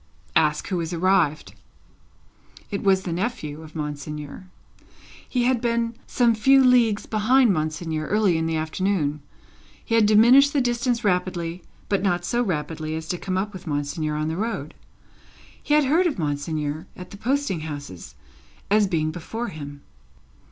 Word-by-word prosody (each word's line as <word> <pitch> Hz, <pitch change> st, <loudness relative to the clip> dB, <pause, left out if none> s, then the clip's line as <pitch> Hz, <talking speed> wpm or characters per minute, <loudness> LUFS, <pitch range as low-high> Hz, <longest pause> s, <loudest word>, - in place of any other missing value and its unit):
"Ask 150 Hz, +2 st, +2 dB
who 185 Hz, -3 st, -1 dB
is 165 Hz, +1 st, -3 dB
arrived." 165 Hz, -, +1 dB, 1.2 s
It 200 Hz, -, -2 dB
was 190 Hz, -1 st, +3 dB
the 175 Hz, -, -3 dB
nephew 170 Hz, -6 st, -3 dB
of 155 Hz, 0 st, -13 dB
Monseigneur. 150 Hz, +3 st, -6 dB, 0.8 s
He 250 Hz, -2 st, 0 dB
had 250 Hz, -1 st, +2 dB
been 235 Hz, -1 st, 0 dB
some 240 Hz, -2 st, +3 dB
few 270 Hz, +5 st, +5 dB
leagues 240 Hz, -5 st, +4 dB
behind 230 Hz, +2 st, +3 dB
Monseigneur, 155 Hz, 0 st, -2 dB
early 210 Hz, -4 st, +2 dB
in 160 Hz, 0 st, 0 dB
the 165 Hz, -, -1 dB
afternoon. 155 Hz, -2 st, -1 dB, 0.6 s
He -, -, -3 dB
had 225 Hz, -2 st, +5 dB
diminished 245 Hz, +7 st, +6 dB
the 290 Hz, -, +2 dB
distance 240 Hz, -1 st, 0 dB
rapidly, 180 Hz, -3 st, -1 dB, 0.3 s
but 200 Hz, -2 st, +1 dB
not 175 Hz, -3 st, 0 dB
so 240 Hz, +5 st, 0 dB
rapidly 155 Hz, -5 st, -3 dB
as 160 Hz, 0 st, -6 dB
to 180 Hz, -, -2 dB
come 185 Hz, -1 st, -2 dB
up 205 Hz, +2 st, -2 dB
with 185 Hz, -2 st, -10 dB
Monseigneur 150 Hz, +1 st, -2 dB
on 155 Hz, +1 st, -1 dB
the 160 Hz, +1 st, -3 dB
road. 195 Hz, -9 st, -3 dB, 0.9 s
He 295 Hz, -, +1 dB
had 300 Hz, -, +5 dB
heard 330 Hz, +7 st, +3 dB
of 305 Hz, -, -2 dB
Monseigneur, 150 Hz, +1 st, -3 dB
at 180 Hz, 0 st, -10 dB
the 200 Hz, -, -9 dB
posting 260 Hz, -, -1 dB
houses, 140 Hz, -, -8 dB, 0.6 s
as 210 Hz, -1 st, +4 dB
being 155 Hz, -4 st, 0 dB
before 225 Hz, +9 st, -5 dB
him. 145 Hz, -2 st, -9 dB
180 Hz, 160 wpm, -24 LUFS, 155-230 Hz, 1.2 s, diminished